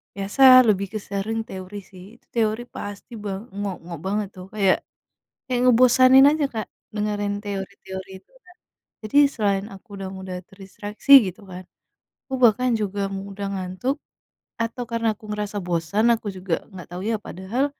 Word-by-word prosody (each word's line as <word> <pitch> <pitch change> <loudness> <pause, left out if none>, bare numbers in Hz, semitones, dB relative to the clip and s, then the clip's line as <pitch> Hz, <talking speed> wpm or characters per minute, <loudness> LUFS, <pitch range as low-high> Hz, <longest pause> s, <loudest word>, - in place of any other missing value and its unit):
biasa 200 +6 -3 0.3
lebih 200 -1 +2
ke 215 - -2
sering 200 +3 -2
teori 190 +2 -8
sih 185 -1 -13
itu, - - -26
teori 220 0 +1
pasti 205 +2 -7
ba 205 - -3 0.3
ngok-ngok 180 -5 -5
banget 205 +1 -1
tuh, 185 0 -9
kayak 195 -3 +3 0.7
kayak 250 -2 -1
ngebosanin 255 +2 +7
aja 305 -2 +1
Kak, 220 -1 -3 0.3
dengerin 205 -1 -1
teori-teori 195 -1 -6
itu 195 - -37
Kak. 360 - -19 0.5
Jadi, 215 +7 -1 0.2
selain 200 -3 0
aku 190 - -14
udah 190 -1 -5
mudah 190 -1 -6
terdistraksi 205 +5 -6 0.2
gitu 185 +3 -8
kan, 180 +1 -8 0.6
aku 265 - -9
bahkan 245 +2 +5
juga 200 0 -2 0.2
mudah 200 0 -6
ngantuk, 190 +8 -2 0.7
atau 230 +2 -2
karena 230 -1 0
aku 215 - -20
ngerasa 210 0 -4
bosan 175 +5 0
aku 225 -1 -7
juga 185 -1 -6 0.2
enggak 185 -4 -10
tahu 180 +1 -5
ya. 225 - +1
Padahal 190 +9 -2
205 Hz, 155 wpm, -23 LUFS, 190-225 Hz, 0.7 s, ngebosanin